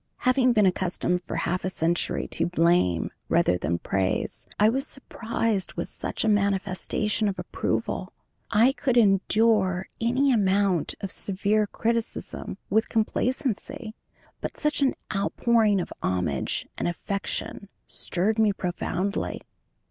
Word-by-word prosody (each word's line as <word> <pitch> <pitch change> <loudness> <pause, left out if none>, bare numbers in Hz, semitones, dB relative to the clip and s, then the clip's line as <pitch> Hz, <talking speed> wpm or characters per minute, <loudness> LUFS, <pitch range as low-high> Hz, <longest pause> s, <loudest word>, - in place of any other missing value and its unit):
Having 255 -1 +4
been 210 -3 +4
accustomed 180 -1 0
for - - -5
half 170 +2 -1
a 185 - 0
century 170 -1 -1
to - - 0
blame 170 - +2 0.2
rather 90 - +3
than 85 0 -1
praise, 95 +2 -1
I 210 - +6
was 270 +5 +1
surprised 225 -6 -2
with - - -4
such - - -3
a - - +2
manifestation 205 +1 +1
of 195 -1 -2
approval; - - -2 0.4
I 230 +4 +5
could 265 -3 0
endure 200 -2 +3
any 260 +4 +3
amount 195 - +2
of 195 - -3
severe 205 +2 +1
criticism 230 -3 -2
with 220 +3 +1
complacency, 245 +1 -1 0.5
but - - -5
such 300 -1 0
an 270 -2 +3 0.2
outpouring 215 +1 +2
of 180 - -4
homage 85 -7 -1
and - - 0
affection 195 +2 -3 0.2
stirred 210 +5 -1
me 215 -2 +5
profoundly. 185 +1 -2
200 Hz, 125 wpm, -26 LUFS, 180-230 Hz, 0.5 s, I